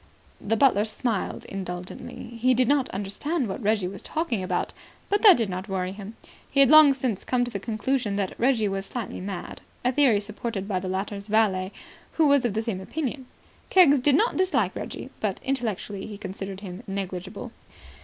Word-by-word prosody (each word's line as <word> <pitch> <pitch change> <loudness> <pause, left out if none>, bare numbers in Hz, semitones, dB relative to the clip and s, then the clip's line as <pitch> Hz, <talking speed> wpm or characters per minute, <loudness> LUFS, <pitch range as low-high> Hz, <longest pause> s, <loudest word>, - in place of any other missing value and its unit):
The 225 +2 +1
butler 215 -5 +4
smiled 220 -1 -2
indulgently. 180 +2 -7
He 255 +1 +4
did 250 0 +3
not 280 -1 +2
understand 230 - -2
what 195 +6 -5
Reggie 210 -3 +1
was 190 +1 -7
talking 310 - -2
about, 185 - -2 0.4
but 410 +1 +2
that 410 -5 +9
did 230 -3 0
not 185 +2 -5
worry 185 -1 -1
him. 205 +2 -9 0.3
He 275 - 0
had 275 0 +6
long 310 -3 +9
since 245 -7 -2
come 245 -1 +1
to 245 - -6
the 200 - -3
conclusion 225 +1 -1
that 200 -2 -1
Reggie 235 -3 +3
was 195 0 -2
slightly 235 -7 -5
mad, 190 -2 -6 0.2
a 250 - +4
theory 260 -6 +4
supported 210 -1 -4
by 190 -3 0
the 185 0 -5
latter's 200 +2 -3
valet, 200 -3 +2 0.4
who 320 - +3
was 280 -3 +4
of 220 -4 -1
the 220 - 0
same 210 -5 -3
opinion. 265 +3 -4 0.4
Keggs 305 -7 +6
did 275 +2 +3
not 445 +10 +2
dislike 375 0 +1
Reggie, - - -6
but - - -2
intellectually 215 -6 -3
he 210 -2 -8
considered 195 0 -6
him 185 -1 -7
negligible. 195 +3 -5
215 Hz, 185 wpm, -26 LUFS, 195-260 Hz, 0.4 s, that